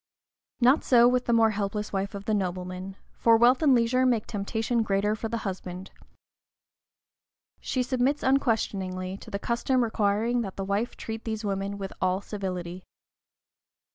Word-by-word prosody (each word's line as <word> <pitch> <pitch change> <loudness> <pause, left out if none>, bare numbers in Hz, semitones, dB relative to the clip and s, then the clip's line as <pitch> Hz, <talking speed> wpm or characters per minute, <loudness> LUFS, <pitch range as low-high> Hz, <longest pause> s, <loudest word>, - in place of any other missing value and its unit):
Not 255 +4 +4
so 240 -2 +6
with 250 0 +1
the - - 0
more 225 -1 +4
helpless 210 0 -3
wife 195 +1 -2
of 200 0 -7
the 215 - 0
nobleman, 185 -1 -3 0.2
for 230 -1 +4
wealth 245 +4 +4
and 285 -4 +5
leisure 240 +2 +2
make 240 -4 +2
temptation 220 +3 -1
greater 205 0 +1
for 225 +1 -5
the 230 - -2
husband. 185 -1 -6 1.7
She 255 - -1
submits 255 +3 0
unquestioningly 195 -8 0
to 220 - -12
the 200 - -3
custom 240 +4 0
requiring 220 +2 +1
that 195 -4 -5
the 195 - -4
wife 205 +5 -2
treat 225 0 -6
these 220 -1 -4
women 200 0 -2
with 195 -1 -6
all 185 0 +1
civility. 185 -3 -5
215 Hz, 155 wpm, -27 LUFS, 195-240 Hz, 1.7 s, so